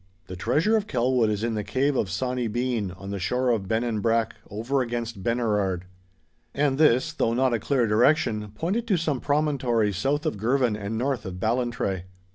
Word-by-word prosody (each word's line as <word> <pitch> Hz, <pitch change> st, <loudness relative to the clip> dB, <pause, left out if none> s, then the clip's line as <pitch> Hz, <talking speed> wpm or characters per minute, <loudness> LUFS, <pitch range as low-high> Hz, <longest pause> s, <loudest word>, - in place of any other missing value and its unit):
'The 95 Hz, -, -8 dB
treasure 150 Hz, -, +2 dB
of 210 Hz, -1 st, 0 dB
Kelwood 125 Hz, -2 st, +2 dB
is 105 Hz, 0 st, -2 dB
in 115 Hz, -1 st, 0 dB
the 105 Hz, -1 st, -2 dB
cave 140 Hz, +6 st, 0 dB
of 105 Hz, -, 0 dB
Sawny 125 Hz, +6 st, -1 dB
Bean 120 Hz, -2 st, -1 dB
on 95 Hz, +2 st, -8 dB
the 100 Hz, -, -3 dB
shore 125 Hz, +7 st, 0 dB
of 105 Hz, -5 st, -1 dB
Bennanbrack 115 Hz, +1 st, +1 dB, 0.2 s
over 115 Hz, +7 st, -1 dB
against 120 Hz, -3 st, -4 dB
Benerard.' 105 Hz, -5 st, 0 dB, 0.7 s
And 140 Hz, -1 st, +1 dB
this, 130 Hz, -5 st, +4 dB
though 115 Hz, -, 0 dB
not 130 Hz, 0 st, +2 dB
a 115 Hz, -, +1 dB
clear 125 Hz, +2 st, +1 dB
direction, 110 Hz, -1 st, +2 dB
pointed 200 Hz, -, -1 dB
to 195 Hz, -5 st, +3 dB
some 150 Hz, -6 st, -1 dB
promontory 135 Hz, -8 st, +1 dB
south 140 Hz, -, -1 dB
of 155 Hz, -, -1 dB
Girvan 120 Hz, 0 st, +2 dB
and 105 Hz, +1 st, -4 dB
north 130 Hz, 0 st, -1 dB
of 90 Hz, -1 st, -6 dB
Ballantrae. 115 Hz, -5 st, -1 dB
120 Hz, 180 wpm, -25 LUFS, 105-135 Hz, 0.7 s, this